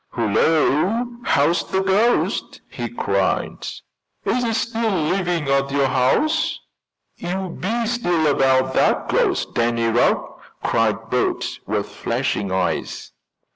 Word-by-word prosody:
"Hullo! 155 Hz, -, +2 dB, 0.2 s
how's 155 Hz, +5 st, +2 dB
the 190 Hz, 0 st, -1 dB
ghost?" 205 Hz, +5 st, +1 dB
he -, -, -4 dB
cried. -, -, -1 dB, 0.6 s
"Is 250 Hz, -, +1 dB
it 225 Hz, -2 st, 0 dB
still 230 Hz, 0 st, -1 dB
living 175 Hz, -3 st, 0 dB
at 140 Hz, 0 st, +1 dB
your 140 Hz, 0 st, +1 dB
house?" 135 Hz, -, +1 dB, 0.6 s
"You 185 Hz, +2 st, -3 dB
be 230 Hz, +5 st, -1 dB
still 175 Hz, -9 st, 0 dB
about 130 Hz, -2 st, +3 dB
that -, -, +2 dB
ghost, -, -, +1 dB
Danny 115 Hz, 0 st, +1 dB
Rugg!" 115 Hz, +1 st, +2 dB, 0.4 s
cried 115 Hz, 0 st, 0 dB
Bert, 125 Hz, -, -1 dB
with -, -, -1 dB
flashing 100 Hz, -2 st, -2 dB
eyes. 95 Hz, -1 st, -2 dB
155 Hz, 115 wpm, -21 LUFS, 125-200 Hz, 0.6 s, about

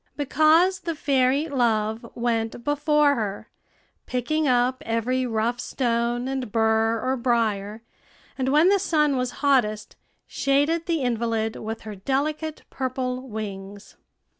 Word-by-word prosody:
Because 315 Hz, +6 st, +3 dB
the 335 Hz, -2 st, -4 dB
fairy 275 Hz, +1 st, +1 dB
Love 225 Hz, -5 st, 0 dB
went 235 Hz, -1 st, -2 dB
before 295 Hz, 0 st, +3 dB
her, 210 Hz, -6 st, -4 dB, 0.6 s
picking 295 Hz, +5 st, -1 dB
up 250 Hz, 0 st, +2 dB
every 250 Hz, +3 st, -1 dB
rough 230 Hz, +1 st, -1 dB
stone 240 Hz, -1 st, -1 dB
and 265 Hz, -4 st, -3 dB
bur 225 Hz, 0 st, +2 dB
or 260 Hz, +3 st, 0 dB
brier, 225 Hz, -3 st, -1 dB, 0.5 s
and 260 Hz, -1 st, -1 dB
when 305 Hz, +6 st, +5 dB
the 400 Hz, 0 st, +4 dB
sun 300 Hz, -6 st, +2 dB
was 250 Hz, -1 st, -1 dB, 0.2 s
hottest, 215 Hz, -7 st, +1 dB, 0.3 s
shaded 290 Hz, +5 st, 0 dB
the 330 Hz, -5 st, 0 dB
invalid 230 Hz, -2 st, -1 dB
with 225 Hz, +1 st, -6 dB
her 215 Hz, -, -7 dB
delicate 295 Hz, +9 st, -2 dB
purple 255 Hz, 0 st, -3 dB
wings. 200 Hz, -2 st, -7 dB
250 Hz, 125 wpm, -24 LUFS, 225-285 Hz, 0.6 s, when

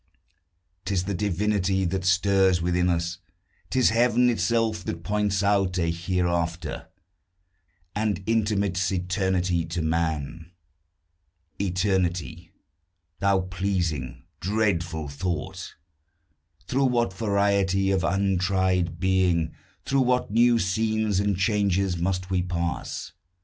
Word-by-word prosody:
'Tis 95 Hz, -3 st, -1 dB
the 100 Hz, +2 st, -3 dB
divinity 95 Hz, 0 st, 0 dB
that 95 Hz, +1 st, -1 dB
stirs 95 Hz, 0 st, +3 dB
within 90 Hz, +1 st, +1 dB
us; 85 Hz, 0 st, -1 dB, 0.5 s
'Tis 130 Hz, -4 st, +3 dB
Heaven 120 Hz, +1 st, +3 dB
itself, 115 Hz, -4 st, 0 dB
that 85 Hz, 0 st, -4 dB
points 105 Hz, -1 st, 0 dB
out 100 Hz, -2 st, +2 dB
a 85 Hz, -2 st, +1 dB
hereafter, 85 Hz, -2 st, -2 dB, 1.1 s
And 105 Hz, -2 st, -1 dB
intimates 100 Hz, -4 st, 0 dB
eternity 90 Hz, -1 st, 0 dB
to 85 Hz, 0 st, -3 dB
man. 80 Hz, +1 st, -2 dB, 1.1 s
Eternity! 90 Hz, -4 st, -1 dB, 0.7 s
thou 100 Hz, -1 st, +2 dB
pleasing, 90 Hz, -8 st, -2 dB, 0.2 s
dreadful 90 Hz, -6 st, -1 dB
thought! 85 Hz, +5 st, -4 dB, 0.9 s
Through 135 Hz, +1 st, +1 dB
what 120 Hz, -6 st, +1 dB
variety 100 Hz, -2 st, +1 dB
of 95 Hz, -2 st, +1 dB
untried 95 Hz, -3 st, +1 dB
being, 90 Hz, -4 st, +1 dB, 0.3 s
Through 135 Hz, 0 st, +2 dB
what 125 Hz, -3 st, +1 dB
new 120 Hz, +2 st, +4 dB
scenes 110 Hz, 0 st, 0 dB
and 100 Hz, -2 st, 0 dB
changes, 100 Hz, -2 st, +1 dB
must 95 Hz, +2 st, -2 dB
we 90 Hz, -1 st, +2 dB
pass! 85 Hz, -2 st, -3 dB
95 Hz, 100 wpm, -25 LUFS, 85-100 Hz, 1.1 s, new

